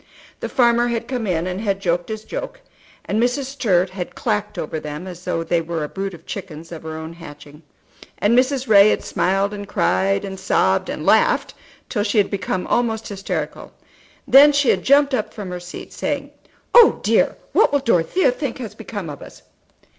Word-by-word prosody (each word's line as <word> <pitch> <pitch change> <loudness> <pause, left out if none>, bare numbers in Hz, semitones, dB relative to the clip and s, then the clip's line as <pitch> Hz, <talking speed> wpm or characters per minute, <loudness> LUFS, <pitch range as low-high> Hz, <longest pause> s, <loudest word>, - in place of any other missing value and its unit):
The - - -4
farmer 240 -1 +3
had 235 -1 -2
come 245 -4 -3
in 170 -2 0
and 185 +2 -3
had 200 -3 -1
joked 175 -1 -1
his 220 0 -5
joke, - - -6 0.5
and 215 +2 0
Mrs. 245 +4 +1
Sturt 205 -9 0
had 185 -2 -6
clacked 210 -2 -2
over 155 +1 -3
them 150 +3 -7
as 180 -1 -10
though 165 -2 -1
they 165 0 0
were 165 -1 -3
a - - -3
brood 195 +2 -5
of 165 - -17
chickens 165 -4 -8
of 165 - -7
her 160 0 -6
own 160 +1 -7
hatching; 150 -2 -12 0.6
and 210 +3 +2
Mrs. 260 +1 +2
Ray 205 -1 +7
had - - 0
smiled 195 +2 0
and 205 -1 -7
cried, 195 -1 +1
and 190 -1 -7
sobbed 95 - +1
and - - -5
laughed - - +3 0.3
till 205 - -2
she 205 +1 -1
had 205 - +3
become 190 -2 -2
almost 225 -2 -1
hysterical. 185 -6 -5 0.5
Then 285 +2 +8
she 285 -2 +2
had 185 - +3
jumped 280 +3 +4
up 220 -5 -2
from 200 -5 -6
her 180 - -5
seat, 175 0 -10
saying, 285 0 -3 0.4
"Oh, 475 -2 +7
dear, - - +2 0.2
what - - +4
will 285 - +3
Dorothea 260 - +2
think 255 -1 -4
has 225 -5 -7
become 205 -4 -7
of 145 -2 -8
us?" - - -13
200 Hz, 195 wpm, -21 LUFS, 175-235 Hz, 0.6 s, Then